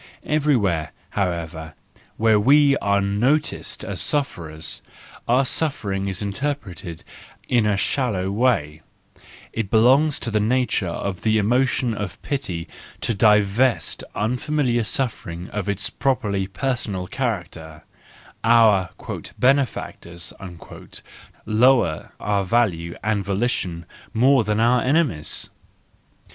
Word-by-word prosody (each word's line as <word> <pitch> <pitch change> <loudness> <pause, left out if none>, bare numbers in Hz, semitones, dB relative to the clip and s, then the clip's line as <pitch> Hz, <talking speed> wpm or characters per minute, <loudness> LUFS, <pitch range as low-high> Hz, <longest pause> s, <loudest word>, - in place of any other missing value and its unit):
Everywhere, 120 - +1 0.2
however, 85 -4 -3 0.4
where 110 -1 +4
we 140 +5 +5
are 100 0 +1
noticed 120 +10 0
as - - -4
sufferers, 85 - -3 0.5
our 125 +3 +3
suffering 105 -11 -1
is 95 0 -3
interpreted 100 - -4 0.4
in 120 -4 +2
a 105 -2 +2
shallow 100 -6 0
way; 100 - +1 0.7
it 115 -4 -2
belongs 135 +8 +4
to 115 - -5
the 105 - +2
nature 120 -2 +1
of 95 +2 -4
the 110 -1 +2
emotion 125 +2 +1
of 105 -5 -5
pity 95 - -3 0.3
to - - 0
divest 105 +4 +2
unfamiliar 125 +2 0
suffering 90 -6 -3
of 105 -1 -3
its 100 +1 -1
properly 105 -8 0
personal 105 -4 -2
character 85 - -4 0.6
:—our 110 -6 +5 0.2
" - - -9
benefactors 125 -10 0 0.6
" - - -15
lower 115 -6 +3
our 100 -1 0
value 90 -6 0
and 105 -1 0
volition 95 -4 -2 0.3
more 130 +2 +5
than 105 0 0
our 120 +2 +4
enemies. 130 - 0
105 Hz, 110 wpm, -22 LUFS, 95-125 Hz, 0.7 s, we